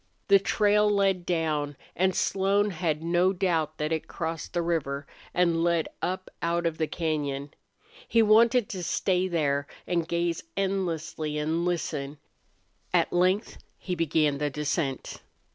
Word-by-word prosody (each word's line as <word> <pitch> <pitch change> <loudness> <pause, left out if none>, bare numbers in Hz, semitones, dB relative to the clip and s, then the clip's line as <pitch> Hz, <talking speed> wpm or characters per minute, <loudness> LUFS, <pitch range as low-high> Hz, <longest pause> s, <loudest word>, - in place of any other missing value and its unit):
The 200 0 +7
trail 210 +1 +3
led 195 -3 +1
down, 155 -4 -1 0.2
and 185 +1 +2
Slone 200 +2 +2
had 160 -3 -1
no 175 +3 +3
doubt 165 -5 0
that 150 +1 -2
it 160 -1 -2
crossed 165 -1 -4
the 175 -1 0
river 145 -4 -1 0.3
and 170 -2 +2
led 170 -2 +1
up 185 +1 -3
out 170 +1 0
of 165 -1 -1
the 160 - +1
cañon. 145 -4 -2 0.6
He 230 -1 +4
wanted 230 +2 +5
to 185 - -4
stay 185 +1 +1
there 145 -5 0 0.2
and 170 -2 0
gaze 170 -1 -1 0.2
endlessly 165 -6 -2
and 160 +3 0
listen. 150 -5 -2 0.7
At - - +2
length 185 +4 +1 0.2
he 185 - -4
began 155 -4 +1
the 150 0 0
descent. 145 -1 -3
170 Hz, 145 wpm, -27 LUFS, 155-185 Hz, 0.7 s, The